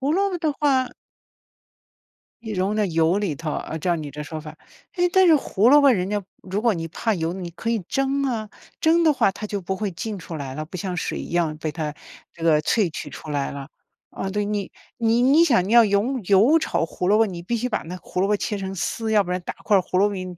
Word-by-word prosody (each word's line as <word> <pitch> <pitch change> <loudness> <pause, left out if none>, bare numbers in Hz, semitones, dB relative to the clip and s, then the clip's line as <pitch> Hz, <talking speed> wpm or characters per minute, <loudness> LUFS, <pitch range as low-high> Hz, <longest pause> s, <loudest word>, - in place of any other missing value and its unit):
胡 275 +2 0
萝 395 +2 +2
卜 360 - -3
的 315 -3 0
话 270 -3 +1 1.5
一 220 -2 -5
溶 190 +3 0
在 210 -2 +1
油 165 +2 +2
里 195 -7 -1
头， 155 +2 -5
啊， - - -4
照 175 +2 0
你 150 -3 -6
这 150 +2 -7
说 155 +1 -6
法。 155 0 -10 0.4
诶， 355 0 +3
但 375 +1 +5
是 320 -3 +7
胡 225 -4 +2
萝 290 +2 +7
卜 280 - +7
人 185 -4 0
家 205 0 -1 0.2
如 195 +3 -3
果 235 - +3
你 165 -3 -4
怕 225 +7 -1
油， 165 -2 -2
你 180 -2 -6
可 200 +7 -6
以 230 - +1
蒸 270 +8 -1
啊， 230 -6 -2 0.3
蒸 335 +1 +4
的 310 - +5
话 230 - +2
它 210 +2 -7
就 205 -1 -3
不 190 +1 -3
会 210 0 -2
浸 205 +3 -5
出 165 -1 -7
来 135 -2 -6
了， 155 +2 -4
不 170 +4 -8
像 180 +1 -3
水 165 - -2
一 - - -8
样 165 -3 0
被 155 0 -3
它 150 -2 -4 0.4
这 165 - -13
个 160 -2 +4
萃 195 +2 +1
取 150 - -7
出 155 - -10
来 140 -1 -1
了。 140 -1 -7 0.4
啊 190 - -5
对， 205 +1 -1
你 205 -1 -3 0.2
你 230 0 +2
你- 285 +6 +6
想 235 - +3
你 - - -1
要 235 -1 +8
油 215 +6 +1
油 210 - +5
炒 315 - -1
胡 180 - -4
萝 205 - +5
卜， 225 - +4
你 175 -4 -6
必 235 +7 -2
须 250 +3 -1
把 - - -2
那 175 +3 -7
胡 - - -6
萝 195 - +3
卜 210 +1 +2
切 210 +1 -3
成 195 0 -5
丝， 220 +4 -2
要 210 - +5
不 180 - -7
然 180 - -1
大 - - -5
块 205 - +3
儿 190 - +5
胡 180 - -1
萝 200 +2 +4
卜 205 - -5
你 185 -1 -4
200 Hz, 280 characters per minute, -23 LUFS, 170-235 Hz, 1.5 s, 要